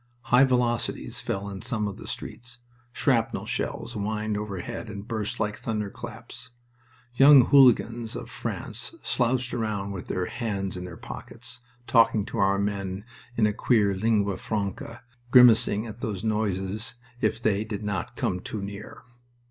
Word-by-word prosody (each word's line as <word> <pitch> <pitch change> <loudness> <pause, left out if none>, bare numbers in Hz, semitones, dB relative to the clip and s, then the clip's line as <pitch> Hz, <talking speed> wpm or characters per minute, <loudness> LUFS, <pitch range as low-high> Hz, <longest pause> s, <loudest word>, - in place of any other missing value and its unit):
High 130 +2 +8
velocities 125 -3 0
fell 100 +1 -3
in 100 -1 -6
some 115 -3 -2
of 100 - -6
the - - -10
streets, 120 0 -7 0.3
shrapnel 120 -3 +1
shells 120 - -3
whined 105 +1 -2
overhead 105 +3 -5
and 100 0 -7
burst 110 -3 -3
like 105 0 -1
thunderclaps. 115 +1 -6 0.6
Young 135 0 +8
hooligans 120 -4 +4
of - - -6
France - - -4
slouched 125 0 0
around 105 -4 -2
with 95 -3 -6
their 90 -1 -1
hands 100 -5 -3
in 90 0 -5
their 85 -2 -8
pockets, 125 - -9 0.3
talking 115 -5 +4
to - - -5
our 100 0 +3
men 100 -1 -2 0.3
in 110 - +4
a 105 - +2
queer 105 -3 +2
lingua 100 -1 +1
franca, 105 +2 -4 0.3
grimacing 115 -3 +6
at 110 +1 -9
those 105 -6 -3
noises 105 0 -1 0.3
if - - +1
they 105 -2 +1
did 105 -1 -5
not 100 -4 -3
come 90 - -1
too 100 +2 -5
near. 100 +1 -8
110 Hz, 150 wpm, -26 LUFS, 100-115 Hz, 0.6 s, High